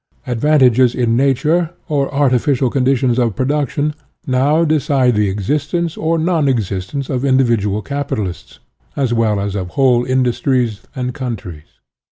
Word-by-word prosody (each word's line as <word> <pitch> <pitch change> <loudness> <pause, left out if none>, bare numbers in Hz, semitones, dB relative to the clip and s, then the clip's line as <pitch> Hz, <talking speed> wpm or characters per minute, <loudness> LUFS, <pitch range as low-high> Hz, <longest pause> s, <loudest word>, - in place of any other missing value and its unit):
Advantages 125 -1 +3
in 120 -2 +1
nat 135 +1 +1
ural 165 +1 +2 0.2
or 140 -3 -1
artificial 135 -2 +1
conditions 130 -2 +1
of 115 -5 0
production 145 +3 -1 0.3
now 145 +5 +2
decide 140 -5 +2
the 105 -2 +1
existence 150 - -2
or 165 +1 0
non 160 -2 +1
existence 110 +2 -2
of 130 -2 -2
individual 115 -7 +1
capitalists, 110 -10 -4 0.4
as 130 -4 0
well 110 -3 +1
as 100 0 -3
of 95 -3 -4
whole 125 -3 +3
industries 125 -3 0
and 125 -1 -3
countries. 105 - -7
130 Hz, 135 wpm, -17 LUFS, 115-145 Hz, 0.4 s, Advantages